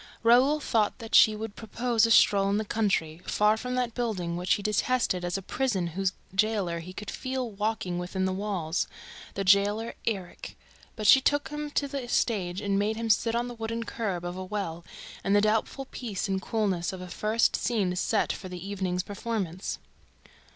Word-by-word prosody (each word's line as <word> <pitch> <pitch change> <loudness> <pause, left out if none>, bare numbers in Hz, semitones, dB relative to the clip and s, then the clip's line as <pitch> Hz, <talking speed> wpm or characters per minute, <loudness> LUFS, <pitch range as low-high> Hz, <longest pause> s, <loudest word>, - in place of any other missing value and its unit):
Raoul 255 +6 +5
thought 225 -7 +1
that 225 -2 -10
she 215 - +7
would 220 -1 -6
propose 230 +1 +1
a - - -2
stroll 200 -3 +5
in 200 - +2
the 215 - -1
country, 185 -7 0
far 210 +1 +3
from 250 +3 -4
that 250 -2 -1
building 200 -9 -2
which 180 +2 +2
he 205 - -6
detested 210 -2 +1
as 175 +1 -1
a 195 - -7
prison 220 -6 -1
whose 190 0 0 0.2
jailer 200 -4 +1
he 175 +2 -8
could 205 +2 -7
feel 255 -3 -3
walking 200 -4 -2
within 185 +1 -2
the 190 - 0
walls... 185 -5 -1 0.5
the 195 - -1
jailer 205 +4 +3
Erik... 195 -6 -4 0.4
But 215 - -5
she 265 +6 +8
took 290 +2 +1
him 295 0 -4
to 285 - +2
the 270 -3 -5
stage 195 -6 0
and 200 -1 +1
made 210 +2 0
him 225 0 0
sit 230 +3 +2
on 240 +1 0
the 245 - -6
wooden 230 0 -3
curb 195 -7 -3
of 175 0 -4
a 185 - -5
well, 185 -4 -4 0.4
in 195 - +1
the 205 - +6
doubtful 220 +5 0
peace 215 -6 -3
and 190 -1 -1
coolness 195 -6 -1
of 190 - -7
a 180 - -7
first 215 +5 +1
scene 200 -7 0
set 205 +3 +1
for 185 - -8
the 180 +1 -7
evening's 185 -3 -2
performance. 200 -3 -3
210 Hz, 195 wpm, -28 LUFS, 185-230 Hz, 0.5 s, she